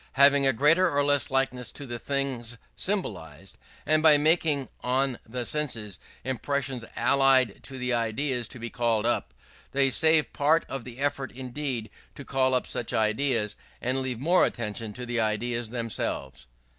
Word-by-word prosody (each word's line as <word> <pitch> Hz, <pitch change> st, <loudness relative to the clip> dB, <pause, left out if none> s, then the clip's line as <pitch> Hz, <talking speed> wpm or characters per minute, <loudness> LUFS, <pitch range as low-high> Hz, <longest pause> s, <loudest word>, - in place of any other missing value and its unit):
have 140 Hz, +1 st, +7 dB
a 140 Hz, -1 st, +4 dB
greater 155 Hz, +9 st, +4 dB
or 145 Hz, -2 st, +1 dB
less 145 Hz, -3 st, +3 dB
likeness 135 Hz, -2 st, 0 dB
to 145 Hz, -, -9 dB
the 120 Hz, -2 st, -5 dB
things 130 Hz, -4 st, -3 dB, 0.2 s
symbolized; 95 Hz, -, -4 dB, 0.3 s
and 155 Hz, +1 st, +3 dB
by 155 Hz, -2 st, +7 dB
making 150 Hz, -2 st, +2 dB, 0.2 s
on 130 Hz, 0 st, 0 dB
the 125 Hz, +1 st, -4 dB
senses 115 Hz, -, -3 dB, 0.2 s
impressions 130 Hz, +1 st, -2 dB
allied 135 Hz, -5 st, +3 dB
to 135 Hz, -, -9 dB
the 125 Hz, -1 st, -1 dB
ideas 120 Hz, +2 st, -1 dB
to -, -, -10 dB
be 120 Hz, 0 st, -6 dB
called 115 Hz, -2 st, 0 dB
up, 120 Hz, -, 0 dB, 0.4 s
they 135 Hz, -1 st, +3 dB
save 160 Hz, +1 st, +3 dB
part 155 Hz, +3 st, +2 dB
of 135 Hz, -3 st, -6 dB
the 125 Hz, -1 st, -9 dB
effort 135 Hz, -2 st, -2 dB
needed 130 Hz, -3 st, -4 dB, 0.2 s
to 140 Hz, -, -9 dB
call 130 Hz, -1 st, +1 dB
up 125 Hz, -, 0 dB
such 115 Hz, -, -4 dB
ideas, 110 Hz, 0 st, +1 dB, 0.2 s
and 130 Hz, +2 st, -1 dB
leave 130 Hz, -2 st, -3 dB
more 170 Hz, +7 st, +4 dB
attention 110 Hz, -1 st, -2 dB
for 125 Hz, +4 st, -7 dB
the 120 Hz, -1 st, -2 dB
ideas 115 Hz, +2 st, -1 dB
themselves. 110 Hz, -, -4 dB
130 Hz, 160 wpm, -27 LUFS, 115-140 Hz, 0.4 s, have